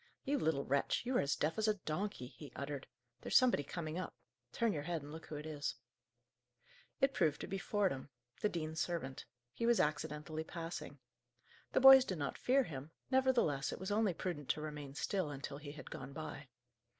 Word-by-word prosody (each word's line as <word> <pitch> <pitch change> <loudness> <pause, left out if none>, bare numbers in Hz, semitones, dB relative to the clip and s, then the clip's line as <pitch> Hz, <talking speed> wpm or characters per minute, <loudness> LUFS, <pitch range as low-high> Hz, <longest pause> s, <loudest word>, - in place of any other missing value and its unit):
"You 285 0 +1
little 155 - +1
wretch, 140 - +1
you 255 +1 0
are - - +4
as 140 - +1
deaf 160 +6 0
as 220 - +2
a 215 - +4
donkey!" 180 -4 -3
he 140 +3 -11
uttered. 140 -1 -4 0.3
"There's - - +4
somebody 255 - +5
coming 155 +3 -4
up. 185 - -5 0.4
Turn 230 -3 +1
your 150 - -2
head, 165 -1 -2
and 145 - -9
look 160 +1 -8
who 155 - -6
it 150 +1 -5
is." 150 -2 -3 1.2
It 270 -1 +3
proved 150 - +2
to - - -3
be 195 0 -3
Fordham, 190 -11 0 0.3
the 210 - +3
dean's 160 -2 -2
servant. 155 -6 -3 0.3
He 230 - -1
was 235 -1 +5
accidentally 155 +1 -1
passing. 165 +1 -6 0.8
The - - +4
boys 265 0 +11
did 185 -8 -3
not 145 - -2
fear 265 +2 +4
him; 145 - -6 0.2
nevertheless, 250 - +3
it - - -5
was 190 +2 -3
only 205 -4 +2
prudent 155 -7 -4
to 150 - +1
remain 150 -3 -6
still, 185 0 0
until 140 0 -5
he 145 -1 -7
had 150 - -10
gone 135 +1 -6
by. 150 -1 -6
160 Hz, 195 wpm, -37 LUFS, 145-205 Hz, 1.2 s, boys